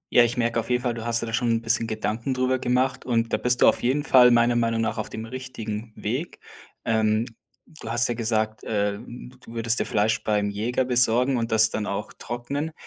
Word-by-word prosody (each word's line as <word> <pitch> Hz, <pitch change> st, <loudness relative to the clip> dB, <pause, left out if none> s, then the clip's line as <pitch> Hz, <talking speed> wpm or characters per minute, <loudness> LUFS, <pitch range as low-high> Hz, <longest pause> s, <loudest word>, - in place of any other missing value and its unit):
Ja, 120 Hz, -, +8 dB
ich 120 Hz, +1 st, -1 dB
merke 115 Hz, -1 st, 0 dB
auf 115 Hz, -, -5 dB
jeden 125 Hz, 0 st, 0 dB
Fall: 120 Hz, -1 st, 0 dB
Du 115 Hz, 0 st, -7 dB
hast 115 Hz, 0 st, +1 dB
dir -, -, -2 dB
da 115 Hz, -, -6 dB
schon 120 Hz, +1 st, 0 dB
'n 115 Hz, 0 st, +1 dB
bisschen 115 Hz, 0 st, +1 dB
Gedanken 110 Hz, +4 st, -3 dB
drüber 130 Hz, 0 st, 0 dB
gemacht 130 Hz, +1 st, 0 dB
und 115 Hz, -2 st, -1 dB
da -, -, +3 dB
bist 125 Hz, 0 st, +1 dB
du -, -, +7 dB
auf -, -, +3 dB
jeden 135 Hz, +4 st, 0 dB
Fall 125 Hz, -4 st, +6 dB
meiner 120 Hz, 0 st, +3 dB
Meinung 115 Hz, -1 st, 0 dB
nach 110 Hz, 0 st, -2 dB
auf 105 Hz, -, -4 dB
dem 110 Hz, -, -6 dB
richtigen 115 Hz, -3 st, -6 dB
Weg. 130 Hz, +11 st, -4 dB, 0.5 s
Ähm, 110 Hz, 0 st, +1 dB, 0.4 s
du 150 Hz, -8 st, -11 dB
hast 115 Hz, 0 st, +2 dB
ja -, -, 0 dB
gesagt 110 Hz, -2 st, -2 dB
äh, 100 Hz, -1 st, -1 dB
d 125 Hz, +1 st, -10 dB
du 115 Hz, -, -12 dB
würdest 115 Hz, +1 st, +2 dB
dir -, -, 0 dB
Fleisch 105 Hz, +1 st, 0 dB
beim 105 Hz, -1 st, 0 dB
Jäger 120 Hz, +5 st, -1 dB
besorgen 125 Hz, +1 st, +3 dB
und 115 Hz, 0 st, -2 dB
das 110 Hz, 0 st, +5 dB
dann 105 Hz, -1 st, -3 dB
auch -, -, -4 dB
trocknen. 140 Hz, +6 st, -5 dB
115 Hz, 230 wpm, -24 LUFS, 110-125 Hz, 0.5 s, Ja